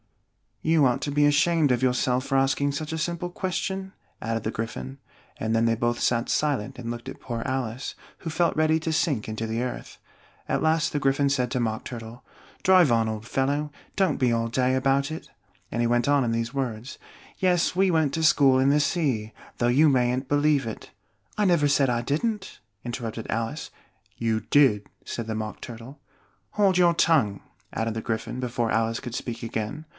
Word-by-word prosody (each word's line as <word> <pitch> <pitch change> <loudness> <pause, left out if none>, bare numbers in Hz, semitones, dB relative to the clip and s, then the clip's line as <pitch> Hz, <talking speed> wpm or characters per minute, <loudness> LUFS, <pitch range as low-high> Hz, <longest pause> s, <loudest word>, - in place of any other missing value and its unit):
"You 160 -2 +4
ought 125 -2 +1
to 145 - -2
be 145 +1 +3
ashamed 145 0 +3
of 125 0 +1
yourself 125 0 +1
for 135 - +1
asking 135 +1 +2
such 155 +2 -4
a - - -2
simple 170 +2 -2
question," 190 +1 -3 0.3
added 115 0 -2
the 110 - -2
Gryphon; 70 - -5 0.4
and 110 0 -1
then 115 0 +3
they 115 - +3
both 120 +1 -1
sat 120 0 +1
silent 135 -4 0
and 120 -2 -6
looked 120 0 -5
at - - -9
poor 115 -2 -4
Alice, 130 -2 -3 0.2
who 165 - -5
felt 170 +2 +1
ready 155 +1 +3
to 160 0 -2
sink 145 -9 0
into 110 +1 -3
the 115 +2 -2
earth. 125 - -6 0.5
At - - 0
last 160 0 +2
the 145 - -1
Gryphon 140 0 +2
said 125 -3 0
to 130 - -1
the - - +1
Mock 110 +1 -2
Turtle, 115 0 -8 0.4
"Drive 185 -7 +5
on, 115 -1 +2
old 110 +1 -5
fellow! 145 +4 0 0.2
Don't 190 -7 +2
be 125 -2 +2
all 115 0 0
day 130 +2 +1
about 135 +2 +1
it!" 160 - -7 0.4
and 120 - -1
he 120 - +2
went 120 +1 +1
on 145 -1 +4
in 115 - 0
these 115 +2 -2
words: 125 -2 -4 0.4
"Yes, 180 -2 +2
we 190 +1 +3
went 160 -5 +2
to 160 - -1
school 140 -4 +5
in 135 +1 +4
the 145 +1 +4
sea, 135 -9 0 0.2
though 120 - +1
you 145 +6 +5
mayn't 130 0 +1
believe 145 -3 +2
it 110 - -7 0.2
" - - -34
"I 210 - +3
never 170 -6 +4
said 140 -2 +3
I 120 -1 +1
didn't!" 195 - -2 0.2
interrupted 120 -2 -5
Alice. 115 +7 -3 0.5
"You 110 -1 0
did," 110 -2 +3 0.2
said 115 - -4
the 110 0 -3
Mock 110 -1 -5
Turtle. 120 +5 -9 0.5
"Hold 195 -3 +3
your 175 -1 +5
tongue!" 140 -12 +2 0.3
added 115 0 -2
the 110 - -2
Gryphon, 115 +2 -3
before 120 -2 -1
Alice 115 0 +1
could 120 -1 -6
speak 120 -2 -5
again. 115 +7 -4
130 Hz, 200 wpm, -25 LUFS, 115-150 Hz, 0.5 s, Drive